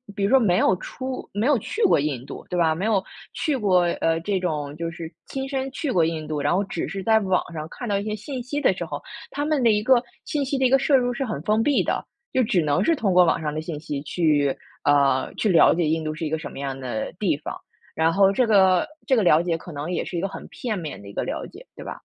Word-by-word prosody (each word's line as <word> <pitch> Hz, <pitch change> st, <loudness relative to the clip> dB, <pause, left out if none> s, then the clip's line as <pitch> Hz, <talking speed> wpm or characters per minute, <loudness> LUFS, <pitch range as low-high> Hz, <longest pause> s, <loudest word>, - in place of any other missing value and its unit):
比 200 Hz, -, -2 dB
如 200 Hz, -, +2 dB
说 270 Hz, -, +6 dB
没 180 Hz, -6 st, +3 dB
有 190 Hz, -, +3 dB
出 260 Hz, +6 st, -6 dB
没 205 Hz, +4 st, 0 dB
有 285 Hz, -1 st, +4 dB
去 450 Hz, -, -3 dB
过 395 Hz, -, +5 dB
印 140 Hz, -4 st, -2 dB
度 -, -, -9 dB
对 180 Hz, -, -2 dB
吧， 160 Hz, -2 st, +3 dB
没 180 Hz, +6 st, -3 dB
有 205 Hz, -4 st, +2 dB, 0.3 s
去 305 Hz, -4 st, -1 dB
过， 190 Hz, -6 st, +3 dB, 0.2 s
呃， 165 Hz, 0 st, +1 dB
这 195 Hz, +2 st, -1 dB
种 150 Hz, -5 st, -3 dB
就 165 Hz, 0 st, -3 dB
是 165 Hz, -1 st, -8 dB, 0.2 s
亲 270 Hz, 0 st, -4 dB
身 270 Hz, -1 st, -2 dB
去 275 Hz, +1 st, -3 dB
过 170 Hz, -8 st, +3 dB
印 160 Hz, -1 st, -3 dB
度。 155 Hz, -1 st, -2 dB
然 145 Hz, +4 st, +1 dB
后 195 Hz, -, +2 dB
只 200 Hz, -, -4 dB
是 195 Hz, -1 st, -5 dB
在 220 Hz, -1 st, +4 dB
网 190 Hz, -3 st, +1 dB
上 155 Hz, 0 st, -5 dB
看 245 Hz, -, -7 dB
到 200 Hz, -, +1 dB
一 200 Hz, -, -4 dB
些 215 Hz, 0 st, -3 dB
信 250 Hz, +5 st, -6 dB
息 285 Hz, +4 st, -3 dB
的 -, -, +4 dB
时 -, -, -5 dB
候， -, -, -6 dB, 0.3 s
他 290 Hz, +1 st, -2 dB
们 305 Hz, -3 st, +1 dB
的 230 Hz, -, +5 dB
一 210 Hz, 0 st, +1 dB
个 250 Hz, +1 st, +5 dB, 0.2 s
信 290 Hz, -2 st, -1 dB
息 275 Hz, +1 st, -1 dB
的 265 Hz, -, +2 dB
一 -, -, +4 dB
个 270 Hz, +1 st, +5 dB
摄 275 Hz, +1 st, +3 dB
入 245 Hz, -1 st, +2 dB
是 270 Hz, +2 st, -2 dB
很 215 Hz, -, -4 dB
封 215 Hz, +6 st, +1 dB
闭 285 Hz, +2 st, +2 dB
的， -, -, -2 dB, 0.3 s
就 260 Hz, -, +3 dB
只 195 Hz, -6 st, +2 dB
能 145 Hz, -1 st, +1 dB
是 330 Hz, -, +3 dB
通 205 Hz, -9 st, 0 dB
过 180 Hz, 0 st, +6 dB
网 165 Hz, -, +1 dB
上 150 Hz, -1 st, -2 dB
的 155 Hz, -, -3 dB
信 160 Hz, -2 st, -5 dB
息 145 Hz, -2 st, -4 dB
去， 150 Hz, -3 st, +1 dB, 0.3 s
呃， 140 Hz, -2 st, +3 dB
去 215 Hz, -, 0 dB
了 170 Hz, -, +6 dB
解 170 Hz, 0 st, 0 dB
印 160 Hz, +1 st, 0 dB
度 155 Hz, 0 st, -2 dB
是 160 Hz, -, -4 dB
一 -, -, -2 dB
个 160 Hz, +1 st, -1 dB
什 155 Hz, -, -6 dB
么 -, -, -9 dB
样 135 Hz, -1 st, -4 dB
的 125 Hz, -4 st, -4 dB
地 180 Hz, -8 st, +2 dB
方。 150 Hz, -, -6 dB, 0.4 s
然 160 Hz, +1 st, +2 dB
后 195 Hz, +1 st, +5 dB
这 245 Hz, +4 st, +2 dB
个 195 Hz, +4 st, +4 dB, 0.2 s
这 260 Hz, -, +3 dB
个 220 Hz, -, +4 dB
了 160 Hz, -3 st, +5 dB
解 170 Hz, -2 st, 0 dB
可 175 Hz, -, -11 dB
能 150 Hz, +4 st, -4 dB
也 175 Hz, -, -1 dB
是 175 Hz, -, -5 dB
一 170 Hz, -, -1 dB
个 195 Hz, -, -1 dB
很 -, -, -9 dB
片 220 Hz, -6 st, -4 dB
面 155 Hz, -, -6 dB
的 100 Hz, -, -11 dB
一 -, -, -11 dB
个 -, -, -2 dB
了 -, -, -4 dB
解， -, -, -14 dB
对 -, -, -9 dB
吧？ -, -, -7 dB
185 Hz, 310 characters per minute, -24 LUFS, 155-240 Hz, 0.4 s, 说